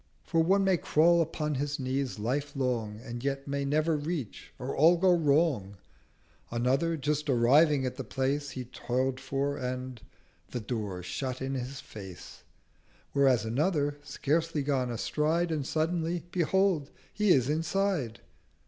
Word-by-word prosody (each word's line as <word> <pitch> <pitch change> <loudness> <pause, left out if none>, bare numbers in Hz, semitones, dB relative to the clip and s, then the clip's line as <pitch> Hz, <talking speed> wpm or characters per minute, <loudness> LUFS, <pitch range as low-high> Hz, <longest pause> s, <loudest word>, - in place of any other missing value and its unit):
For 165 -2 +1
one 195 +4 +3
may 190 -2 +3
crawl 170 +2 +4
upon 155 -1 -2
his 145 +1 -2
knees 130 -1 -2
Life 135 +8 -2
long, 115 -6 -1
And 120 0 -6
yet 140 0 -2
may 140 0 -1
never 155 +3 +2
reach, 150 - -4
or 130 +2 -4
all 165 +4 +6
go 185 +1 +4
wrong: 145 - +2 0.7
140 - - -7
Another 135 +7 +1
just 150 +1 -1
arriving 135 +3 +4
at 125 - -3
the 135 - -4
Place 135 +4 -1
He 130 -2 -6
toil'd 130 +2 -2
for, 135 +1 -2
and—the 125 -1 -7
Door 105 -5 -4
shut 130 +8 -3
in 135 0 -3
his 135 +1 -4
Face: 95 -4 -10 0.7
Whereas 130 -5 +3
Another, 145 +4 0
scarcely 150 +1 -1
gone 135 -3 0
a 120 - -3
Stride, 165 +6 0
And 150 -4 -2
suddenly—Behold 170 0 0 0.2
he 210 -1 +1
is 130 -8 +5
Inside! 160 - -1
140 Hz, 145 wpm, -29 LUFS, 125-160 Hz, 0.7 s, all